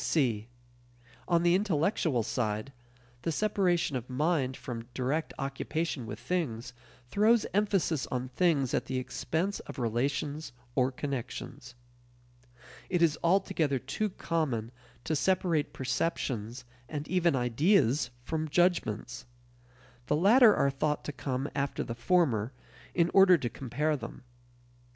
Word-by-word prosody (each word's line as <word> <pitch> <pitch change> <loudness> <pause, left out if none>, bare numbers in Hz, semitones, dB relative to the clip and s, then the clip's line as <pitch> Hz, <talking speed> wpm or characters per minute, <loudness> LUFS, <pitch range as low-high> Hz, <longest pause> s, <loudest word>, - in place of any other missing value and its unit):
(c) 115 -8 +1 0.8
On 170 -1 +3
the 175 0 +4
intellectual 165 - +1
side, 110 +2 -2 0.5
the 165 - -1
separation 180 -5 +1
of 125 0 -4
"mind" 135 -1 0
from 115 -2 -6
direct 140 +5 -1
occupation 135 -1 -3
with 105 - -5
things 125 -7 -3 0.4
throws 220 +4 +4
emphasis 195 - +1
on 125 0 -3
things 140 -3 +1
at - - 0
the 130 - -3
expense 160 +9 -2
of - - -9
relations 135 +5 -2 0.2
or 130 0 +2
connections. 135 -3 -5 1.1
It 175 -2 +2
is 160 -2 +3
altogether 170 -5 +2
too 135 - -2
common 145 - -2 0.3
to 160 - -1
separate 170 -2 +1
perceptions 125 -3 -2 0.2
and 150 -1 -4
even 175 -4 +2
ideas 130 - +2
from 160 +3 -2
judgments. 170 - 0 0.8
The 150 - +2
latter 215 - +6
are 140 - +2
thought 150 +2 -1
to - - -4
come 135 0 -3
after 140 -1 -1
the 115 - -5
former 125 - +1 0.4
in 170 -1 +3
order 190 -2 +7
to 130 -6 -3
compare 140 +6 -1
them. 135 -1 -8
145 Hz, 125 wpm, -30 LUFS, 125-170 Hz, 1.1 s, order